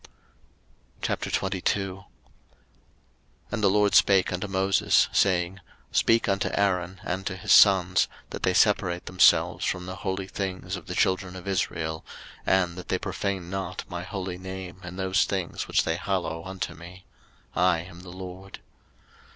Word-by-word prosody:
03:022:001 95 0 -1 1.5
And 115 -2 -2
the 100 - +6
LORD 105 +1 +3
spake 95 -2 +5
unto 90 +4 -3
Moses, 95 0 +3
saying, 90 0 +2 0.3
03:022:002 - - -12
Speak 115 +1 +3
unto 100 -1 +1
Aaron 95 -2 0
and 95 0 -3
to 95 - -3
his 95 - -2
sons, 95 -3 +6 0.2
that - - -6
they 95 - +2
separate 90 -4 +2
themselves 90 0 +4
from 90 0 -1
the 95 0 -6
holy 95 0 -3
things 95 -1 -4
of 90 - -9
the 90 - -4
children 95 0 +1
of 95 +1 -9
Israel, 80 -4 -2 0.4
and 90 -2 +2
that 90 - -9
they 95 - 0
profane 95 -2 -3
not 95 -2 -4
my 85 0 -5
holy 90 0 -5
name 95 -1 -8
in 90 +1 -8
those 95 0 +2
things 95 -3 -3
which - - +2
they 80 0 -1
hallow 90 -3 -2
unto 95 -3 -4
me: 85 +3 -12 0.5
I 90 -2 +3
am 85 0 -12
the 90 - -11
LORD. 95 +1 -9
95 Hz, 150 wpm, -26 LUFS, 90-95 Hz, 1.5 s, the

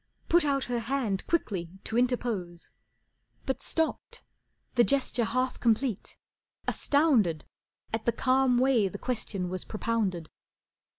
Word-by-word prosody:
Put 345 0 +5
out 275 -2 +1
her 245 -1 -2
hand 230 -5 -2
quickly 195 - -1
to 220 - -4
interpose, 235 -8 -1 0.7
But 265 0 -2
stopped, 330 - -2 0.5
the 240 - +5
gesture 255 -3 +2
half 255 +3 -1
complete, 230 -2 0 0.5
astounded 245 - +2 0.5
At 225 0 -2
the - - +5
calm 255 +1 +2
way 250 -5 +3
the 185 - -6
question 215 -6 -3
was 185 0 -4
propounded. 210 -7 -2
240 Hz, 120 wpm, -28 LUFS, 205-265 Hz, 0.7 s, Put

